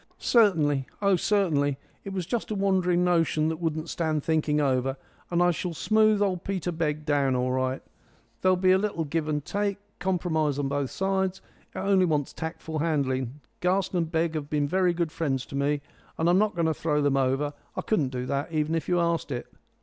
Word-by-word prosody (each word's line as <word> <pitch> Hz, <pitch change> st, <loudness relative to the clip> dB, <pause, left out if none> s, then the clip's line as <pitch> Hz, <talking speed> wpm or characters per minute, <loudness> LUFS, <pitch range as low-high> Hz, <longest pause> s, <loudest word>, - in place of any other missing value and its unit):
"Certainly; 155 Hz, -, +3 dB
oh, 200 Hz, -2 st, +3 dB
certainly! 160 Hz, -8 st, +1 dB, 0.3 s
It 195 Hz, -, -6 dB
was 185 Hz, -3 st, -3 dB
just 225 Hz, +6 st, -2 dB
a 215 Hz, -, -2 dB
wandering 185 Hz, -3 st, +2 dB
notion 165 Hz, -3 st, +2 dB
that 160 Hz, -, -2 dB
wouldn't 160 Hz, -1 st, -2 dB
stand 155 Hz, -3 st, -1 dB
thinking 155 Hz, -2 st, +1 dB
over. 135 Hz, -1 st, +1 dB, 0.3 s
And 175 Hz, 0 st, +2 dB
I 175 Hz, -, +4 dB
shall 170 Hz, 0 st, -4 dB
smooth 215 Hz, +2 st, +3 dB
old 185 Hz, -3 st, -1 dB
Peter 185 Hz, -3 st, -2 dB
Begg 155 Hz, -2 st, -2 dB
down 140 Hz, -3 st, +2 dB
all 125 Hz, 0 st, 0 dB
right. 130 Hz, 0 st, -1 dB, 0.6 s
There 185 Hz, -, +3 dB
will -, -, +4 dB
be 185 Hz, 0 st, +4 dB
a 190 Hz, -, +5 dB
little 200 Hz, -5 st, -1 dB
give 155 Hz, +1 st, -2 dB
and 150 Hz, -1 st, -2 dB
take 200 Hz, -1 st, -1 dB, 0.2 s
compromise 165 Hz, -6 st, 0 dB
on 145 Hz, -1 st, 0 dB
both 140 Hz, -1 st, -1 dB
sides. 190 Hz, -1 st, -1 dB, 0.4 s
It -, -, -6 dB
only 195 Hz, -2 st, +3 dB
wants 150 Hz, -5 st, 0 dB
tactful 160 Hz, -1 st, -5 dB
handling. 140 Hz, -4 st, -1 dB, 0.2 s
Garson 180 Hz, -1 st, +1 dB
& -, -, -3 dB
Begg 165 Hz, 0 st, 0 dB
have 150 Hz, -2 st, -4 dB
been 145 Hz, -1 st, +1 dB
very 180 Hz, +1 st, +2 dB
good 170 Hz, -2 st, -1 dB
friends 135 Hz, -6 st, -1 dB
to -, -, -9 dB
me, 140 Hz, +1 st, 0 dB, 0.4 s
and 160 Hz, -, +1 dB
I'm 175 Hz, +2 st, +5 dB
not 210 Hz, -1 st, +1 dB
going 170 Hz, -1 st, +1 dB
to 160 Hz, -, +2 dB
throw 150 Hz, -1 st, 0 dB
them 140 Hz, -1 st, +2 dB
over. 135 Hz, +2 st, +1 dB, 0.2 s
I -, -, -2 dB
couldn't 155 Hz, -12 st, +1 dB
do 125 Hz, -1 st, -4 dB
it, 140 Hz, +2 st, -1 dB
even 155 Hz, -1 st, 0 dB
if 165 Hz, 0 st, -2 dB
you 175 Hz, -1 st, +3 dB
asked 170 Hz, -1 st, 0 dB
it." 120 Hz, -, -3 dB
160 Hz, 205 wpm, -27 LUFS, 145-185 Hz, 0.6 s, a